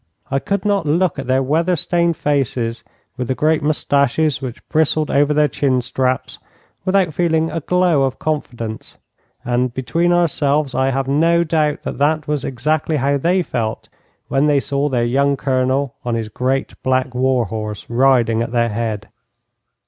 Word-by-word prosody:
I 135 - +1
could 200 +6 -2
not 200 -6 +1
look 170 +1 +1
at 135 - -5
their 130 +1 +2
weather 165 +6 +1
stained 170 0 0
faces, 125 -5 -1 0.3
with 125 -2 -3
the 130 - -1
great 155 +2 +2
moustaches 145 -1 +1
which 125 -3 -7
bristled 155 0 +1
over 145 +1 +3
their 150 0 +3
chin 130 +1 0
straps, 130 +1 -2 0.5
without 185 -4 +2
feeling 160 -1 +1
a 165 - -2
glow 180 -2 +2
of 135 -1 0
confidence, 120 -8 -4 0.5
and, 125 +1 0
between 165 +7 0
ourselves, 150 -5 +1
I 130 0 +1
have 135 0 -1
no 165 +5 +3
doubt 155 -2 0
that - - -5
that 155 +1 +1
was 150 -2 -1
exactly 150 +5 -1
how 140 +1 +1
they 180 +5 +2
felt 115 -7 -3 0.4
when 135 +2 +2
they 145 -2 +3
saw 140 +1 -1
their 120 -3 +1
young 140 +3 +1
Colonel 130 0 0
on 120 -2 -1
his 110 -2 -3
great 130 +4 -1
black 130 0 0
war 130 -1 +1
horse 105 0 -5
riding 120 -2 +3
at 115 0 -3
their 120 -1 +1
head. 110 -1 -3
140 Hz, 165 wpm, -19 LUFS, 125-155 Hz, 0.5 s, over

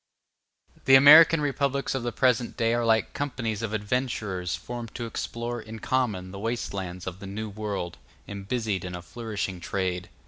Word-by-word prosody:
The 135 - +8
American 150 +4 +9
republics 140 -1 0
of 135 - -2
the 120 0 -2
present 125 -1 +1
day 115 0 +2
are 120 0 +1
like 110 -1 +2
companies 115 -7 -3
of 115 -2 -3
adventurers 105 -4 -2
formed 120 -2 -7
to 120 - -4
explore 115 +1 -4
in 110 +1 -9
common 110 -7 -1
the 100 - -8
waste 115 +1 -3
lands 90 -2 -5
of 95 0 -6
the 100 - -8
New 105 +2 -5
World, 100 -4 -4 0.3
and 100 -1 -7
busied 110 -6 -1
in 90 -1 -5
a 90 - -8
flourishing 105 -4 -4
trade. 90 0 -3
110 Hz, 175 wpm, -26 LUFS, 95-120 Hz, 0.3 s, American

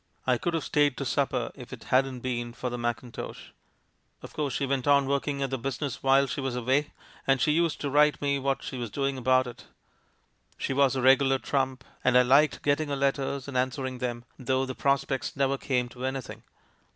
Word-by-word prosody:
I 125 -2 +2
could 170 -1 -1
have 165 - -1
stayed 145 -3 +2
to - - -3
supper - - 0
if - - -12
it - - -9
hadn't 130 -1 +2
been 120 -2 -3
for 125 +1 -4
the 125 - -3
mackintosh! 120 +1 -5 0.7
"Of - - -10
course 145 -4 -2
she 140 - 0
went 135 -1 -1
on 140 -1 +5
working 140 0 -1
at 135 - -3
the 135 - -2
business 135 +1 -4
while 135 +1 +4
she 140 +1 -4
was 135 -2 -2
away, 130 +4 +1 0.4
and 135 -1 +4
she 150 - +3
used 165 +1 +1
to 145 - -1
write 150 +1 +4
me 140 -1 0
what 135 0 -1
she 130 - -5
was 120 -2 -4
doing 135 +4 -1
about 130 0 +3
it. 120 -2 -10 0.9
She - - -2
was 135 -1 +3
a 130 - -1
regular 135 0 +5
trump, 130 -1 -1 0.2
and 125 0 +4
I 125 - +7
liked 140 +4 +3
getting 145 +1 +1
her 140 - -1
letters 140 0 -1
and 140 - -7
an 130 +1 +2
swering 130 0 -5
them, 120 -1 -3
though 130 +1 0
the 130 - -5
prospects 140 -1 0
never 135 0 +1
came 125 -2 -1
to 125 +1 -10
anything. 130 -1 -4
135 Hz, 210 wpm, -27 LUFS, 125-140 Hz, 0.9 s, I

